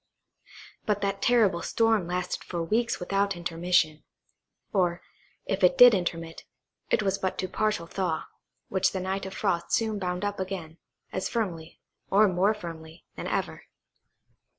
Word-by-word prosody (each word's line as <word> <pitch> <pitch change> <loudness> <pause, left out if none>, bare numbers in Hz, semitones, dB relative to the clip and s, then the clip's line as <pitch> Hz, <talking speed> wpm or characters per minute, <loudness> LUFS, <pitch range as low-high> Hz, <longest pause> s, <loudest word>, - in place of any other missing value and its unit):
But 210 -1 +1
that 195 0 -1
terrible 220 -8 +3
storm 225 -4 +2
lasted 180 0 -2
for 170 -2 -3
weeks 230 +7 0
without 200 +2 0
intermission; 170 -2 +1 0.7
or, 175 -3 +1 0.4
if 195 0 -2
it 180 - +5
did 245 -1 +10
intermit, 165 -3 -3 0.5
it - - +2
was 195 0 0
but 190 -1 -2
to 185 - -1
a - - -7
partial 215 -3 0
thaw, 170 -2 -2 0.4
which 190 -1 +1
the 190 - -2
night 190 +1 -3
of 190 - -8
frost 180 -5 -1
soon 220 -2 +1
bound 180 +1 -2
up 205 -1 -3
again, 185 -4 -5 0.3
as 190 - -2
firmly, 170 -8 -3 0.3
or 210 +2 +5
more 190 +3 +2
firmly, 165 -4 -9
than - - -5
ever. - - -3
190 Hz, 150 wpm, -27 LUFS, 170-205 Hz, 0.7 s, did